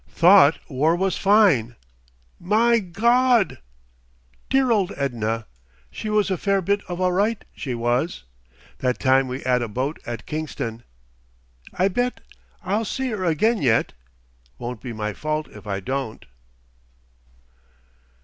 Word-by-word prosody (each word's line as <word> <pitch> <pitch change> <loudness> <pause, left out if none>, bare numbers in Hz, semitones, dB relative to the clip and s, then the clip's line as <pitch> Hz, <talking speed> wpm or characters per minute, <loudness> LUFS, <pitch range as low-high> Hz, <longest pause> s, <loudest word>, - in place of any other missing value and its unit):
Thought 175 -3 +6
war 150 +4 +1
was 190 +1 0
fine. 190 - +3 0.6
My 230 +5 +3
Gawd!... 235 +4 +2 0.9
"Dear 265 -2 +3
old 200 -4 +2
Edna. 115 -5 -2 0.5
She 215 - -5
was 210 -2 +1
a 185 - -1
fair 200 -1 +1
bit 200 +2 0
of 175 -1 -5
all 185 0 +2
right 205 +5 0
she 130 -4 -4
was. 120 +8 -1 0.6
That 125 -1 0
time 130 0 +3
we 130 +1 -6
'ad 125 -1 +2
a 120 - -2
boat 130 +8 -3
at 120 -1 -6
Kingston.... 145 -7 -5 0.9
"I 185 - +2
bet 245 +6 -1 0.4
I'll 205 +4 0
see 255 +3 -3
'er 190 -3 -3
again 210 +7 +2
yet. 115 -4 +2 0.6
Won't 120 -2 -6
be 125 - -6
my 105 -1 -4
fault 155 +5 -3
if - - -13
I 100 -1 -2
don't."... 130 +2 -4
165 Hz, 135 wpm, -23 LUFS, 125-205 Hz, 0.9 s, Thought